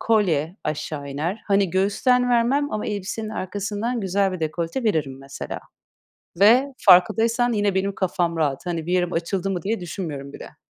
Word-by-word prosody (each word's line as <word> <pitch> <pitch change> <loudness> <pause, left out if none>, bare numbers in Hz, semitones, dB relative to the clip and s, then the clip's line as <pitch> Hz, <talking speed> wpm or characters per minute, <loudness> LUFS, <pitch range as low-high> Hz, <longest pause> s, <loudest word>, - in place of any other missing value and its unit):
kolye 180 -7 +1
aşağı 150 -1 -4
iner. 155 +9 -3
Hani 200 -2 +2
göğüsten 245 +7 +2
vermem 255 +5 +2
ama 215 - -2
elbisenin 210 +1 -4
arkasından 205 +4 -3
güzel 195 0 +1
bir 185 - -5
dekolte 165 +9 -2
veririm 155 -11 0
mesela 135 +1 -7 0.8
ve 250 +7 +5
farkındaysan 225 +6 +4
yine 205 -2 +1
benim 195 +1 0
kafam 175 -2 -1
rahat. 145 -2 -1
Hani 170 -3 -3
bir 175 - -1
yerim 180 -1 +1
açıldı 180 +3 -1
mı 185 -2 -2
diye 220 +6 -2
düşünmüyorum 155 -6 -6
bile. - - -10
190 Hz, 155 wpm, -23 LUFS, 165-215 Hz, 0.8 s, ve